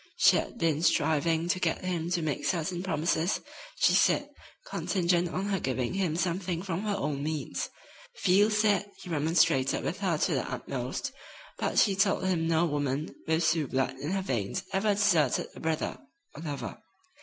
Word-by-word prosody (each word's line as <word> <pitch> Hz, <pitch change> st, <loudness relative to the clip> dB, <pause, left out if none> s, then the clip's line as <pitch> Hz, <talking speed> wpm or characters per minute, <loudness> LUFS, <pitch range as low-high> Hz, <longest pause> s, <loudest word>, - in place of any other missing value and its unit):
She -, -, +6 dB
had -, -, -4 dB
been 160 Hz, -7 st, +1 dB
striving 160 Hz, 0 st, +2 dB
to 185 Hz, -, +1 dB
get 170 Hz, +1 st, -1 dB
him 175 Hz, -2 st, -2 dB
to 175 Hz, -2 st, 0 dB
make 150 Hz, -3 st, -2 dB
certain 175 Hz, 0 st, -1 dB
promises, 170 Hz, 0 st, 0 dB, 0.4 s
she -, -, +4 dB
said, -, -, +3 dB, 0.4 s
contingent 180 Hz, -, 0 dB
on 185 Hz, +3 st, -2 dB
her 195 Hz, -2 st, 0 dB
giving 130 Hz, -1 st, -1 dB
him 185 Hz, -5 st, 0 dB
something 180 Hz, 0 st, -1 dB
from 185 Hz, -2 st, -2 dB
her 210 Hz, -1 st, -1 dB
own 150 Hz, -7 st, -2 dB
means. 155 Hz, +1 st, -3 dB, 0.5 s
Field 205 Hz, -, +4 dB
said 210 Hz, -1 st, +2 dB
he 180 Hz, -, -11 dB
remonstrated 150 Hz, -4 st, +2 dB
with 185 Hz, -, -3 dB
her 185 Hz, -5 st, +1 dB
to -, -, +1 dB
the -, -, -2 dB
utmost, -, -, -4 dB, 0.5 s
but -, -, -1 dB
she 200 Hz, -3 st, +5 dB
told 195 Hz, -1 st, +2 dB
him 170 Hz, -3 st, +1 dB
no 165 Hz, +1 st, +3 dB
woman 145 Hz, -1 st, -2 dB
with 160 Hz, +1 st, +2 dB
Sioux 160 Hz, -3 st, +2 dB
blood 130 Hz, 0 st, -1 dB
in 145 Hz, -, -4 dB
her 190 Hz, +1 st, -1 dB
veins 125 Hz, -, -2 dB
ever 200 Hz, +2 st, +2 dB
deserted 175 Hz, -10 st, +2 dB
a -, -, -9 dB
brother 160 Hz, -1 st, -2 dB, 0.3 s
or -, -, -9 dB
lover. 145 Hz, -4 st, -5 dB
170 Hz, 175 wpm, -29 LUFS, 155-190 Hz, 0.5 s, She